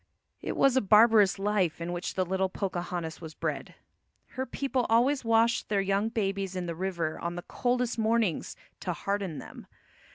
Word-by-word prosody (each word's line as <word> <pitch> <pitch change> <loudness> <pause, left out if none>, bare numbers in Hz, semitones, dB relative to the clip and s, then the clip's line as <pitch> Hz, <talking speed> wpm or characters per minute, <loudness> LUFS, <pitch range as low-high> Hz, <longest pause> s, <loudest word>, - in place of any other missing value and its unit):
It - - -4
was 270 -2 +4
a 260 - +4
barbarous 210 -1 +5
life 195 -5 0
in 170 +1 -4
which 175 +1 -4
the 185 - +1
little 190 +1 0
Pocahontas 175 -4 -4
was 160 -2 -9
bred. - - -4 0.5
Her 260 0 -4
people 265 -3 -1
always 255 +5 +3
washed 230 +1 +2
their 205 -1 +2
young 195 +2 +1
babies 195 -4 -2
in 180 -1 -3
the 170 - -3
river 170 -2 -3
on 170 0 -3
the 175 - -6
coldest 245 -1 -1
mornings 220 -5 0 0.2
to 180 - -3
harden 195 -3 -3
them. - - -10
195 Hz, 170 wpm, -29 LUFS, 175-225 Hz, 0.5 s, barbarous